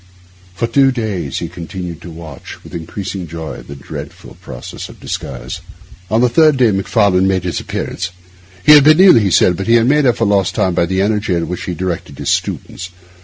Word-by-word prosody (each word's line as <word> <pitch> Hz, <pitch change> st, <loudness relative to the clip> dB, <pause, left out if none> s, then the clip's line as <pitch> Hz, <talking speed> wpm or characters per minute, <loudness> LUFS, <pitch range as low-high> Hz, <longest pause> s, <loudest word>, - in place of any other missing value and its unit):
For 115 Hz, -, -1 dB
two 135 Hz, +3 st, +3 dB
days 105 Hz, -, -3 dB
he -, -, -3 dB
continued 85 Hz, -1 st, -7 dB
to 90 Hz, -, -9 dB
watch, 80 Hz, -4 st, -10 dB
with -, -, -13 dB
increasing 90 Hz, +2 st, -5 dB
joy, 80 Hz, -1 st, -7 dB
the 70 Hz, -, -10 dB
dreadful 70 Hz, -, -9 dB
process -, -, -8 dB
of -, -, -14 dB
disguise. -, -, -6 dB, 0.5 s
On 110 Hz, +2 st, +2 dB
the 125 Hz, -, +5 dB
third 155 Hz, +4 st, +4 dB
day 120 Hz, -4 st, +4 dB
Macfarlane 95 Hz, -1 st, +2 dB
made 95 Hz, -2 st, 0 dB
his -, -, -2 dB
appearance. 90 Hz, 0 st, -4 dB, 0.6 s
He -, -, +8 dB
had 150 Hz, -2 st, +9 dB
been 155 Hz, +3 st, +6 dB
ill, 185 Hz, -10 st, +8 dB
he 100 Hz, -3 st, +1 dB
said; 90 Hz, 0 st, +4 dB
but 95 Hz, -, -4 dB
he 115 Hz, +1 st, +5 dB
made 140 Hz, +3 st, +3 dB
up 120 Hz, -, +2 dB
for 115 Hz, -, +1 dB
lost 100 Hz, -3 st, +1 dB
time 95 Hz, -, +1 dB
by 85 Hz, -1 st, +1 dB
the 95 Hz, +2 st, 0 dB
energy 105 Hz, -2 st, 0 dB
with 85 Hz, -, -1 dB
which 90 Hz, +1 st, -5 dB
he 90 Hz, -, -4 dB
directed 90 Hz, 0 st, -4 dB
the -, -, -8 dB
students. 90 Hz, -, -2 dB
95 Hz, 205 wpm, -16 LUFS, 85-115 Hz, 0.6 s, had